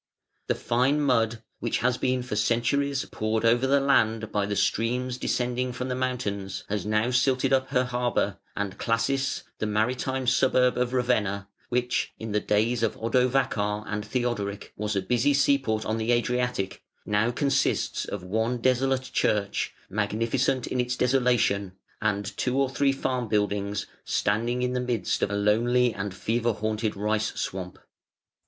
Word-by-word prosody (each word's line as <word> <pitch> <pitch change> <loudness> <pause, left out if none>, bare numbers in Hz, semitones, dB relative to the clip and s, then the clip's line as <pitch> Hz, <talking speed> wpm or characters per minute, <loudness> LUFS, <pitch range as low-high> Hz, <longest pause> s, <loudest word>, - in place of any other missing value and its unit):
The - - +1
fine 130 +5 +1
mud, 115 -5 +1 0.2
which 115 - -1
has 125 0 +1
been 130 -1 0
for 125 -4 -4
centuries 135 +5 +1
poured 110 +1 -1
over 120 +3 +4
the 140 +1 +4
land 115 -5 +2
by 100 -1 0
the 100 - -2
streams 125 +4 0
descending 125 +1 -1
from 125 +1 -4
the 125 - -1
mountains, 100 -7 -3
has 105 -1 -2
now 110 +3 +1
silted 130 +1 +2
up 130 0 +2
her 125 -2 +2
harbour, 120 -5 -1 0.2
and 100 -1 -3
Classis, 135 +4 0 0.2
the 110 - -1
maritime 125 +5 0
suburb 125 0 +3
of 125 0 0
Ravenna, 105 -6 0 0.2
which, 125 0 0
in 110 -1 -6
the 105 - +2
days 110 +3 +1
of 115 - 0
Odovacar 115 -3 +1
and 105 +1 -3
Theodoric, 105 -3 -3
was 105 0 -2
a 100 - 0
busy 125 +7 +2
sea 140 0 +4
port 110 -4 -2
on 110 +1 -1
the 110 +2 0
Adriatic, 120 -4 -1 0.2
now 105 +2 +2
consists 135 +2 0
of 100 -3 -5
one 110 +6 0
desolate 130 +2 +1
church 105 -5 0 0.2
magnificent 115 +6 0
in - - -2
its 125 0 -2
desolation 120 -7 +2 0.3
and 100 -2 -1
two 125 +1 0
or 135 -1 +1
three 140 0 +2
farm 130 -3 -2
buildings 105 -1 0 0.2
standing 115 +4 0
in 125 0 0
the 125 - 0
midst 120 -6 -1
of - - +1
a 100 - -2
lonely 115 +4 +3
and 100 -1 -4
fever 115 +3 0
haunted 110 +1 -2
rice 105 +1 -1
swamp. 90 -1 -4
120 Hz, 160 wpm, -26 LUFS, 105-125 Hz, 0.3 s, over